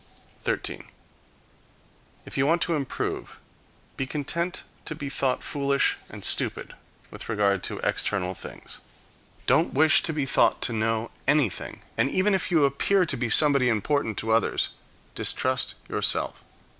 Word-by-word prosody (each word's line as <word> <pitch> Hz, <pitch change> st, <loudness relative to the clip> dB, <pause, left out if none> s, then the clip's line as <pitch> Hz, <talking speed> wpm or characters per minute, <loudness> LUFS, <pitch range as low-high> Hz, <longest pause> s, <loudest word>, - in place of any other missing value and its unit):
13. -, -, -2 dB, 1.4 s
If -, -, -9 dB
you 135 Hz, +1 st, +2 dB
want 170 Hz, +2 st, +3 dB
to 170 Hz, -, -1 dB
improve, 140 Hz, -3 st, -4 dB, 0.6 s
be 135 Hz, -, -2 dB
content 170 Hz, +5 st, -2 dB, 0.2 s
to 155 Hz, -, -3 dB
be 145 Hz, -2 st, -5 dB
thought 130 Hz, -2 st, 0 dB
foolish 140 Hz, -1 st, +1 dB
and -, -, -7 dB
stupid -, -, +1 dB, 0.4 s
with -, -, -10 dB
regard 100 Hz, -3 st, +1 dB
to -, -, -4 dB
external 90 Hz, -1 st, 0 dB
things. -, -, -9 dB, 0.7 s
Don't -, -, +2 dB
wish 155 Hz, +2 st, +5 dB
to 165 Hz, -, -2 dB
be 150 Hz, -3 st, -1 dB
thought 135 Hz, -, +3 dB
to 120 Hz, -, 0 dB
know 115 Hz, +1 st, -1 dB, 0.2 s
anything; 140 Hz, -8 st, +1 dB, 0.2 s
and 135 Hz, -, +3 dB
even 190 Hz, +5 st, +2 dB
if 190 Hz, -, 0 dB
you 160 Hz, -5 st, +4 dB
appear 180 Hz, +8 st, +2 dB
to -, -, -2 dB
be 120 Hz, -1 st, -2 dB
somebody 140 Hz, -2 st, +5 dB
important 115 Hz, 0 st, 0 dB
to 110 Hz, -, -1 dB
others, 110 Hz, -1 st, +2 dB, 0.4 s
distrust 130 Hz, 0 st, 0 dB
yourself. -, -, 0 dB
140 Hz, 145 wpm, -26 LUFS, 115-155 Hz, 1.4 s, wish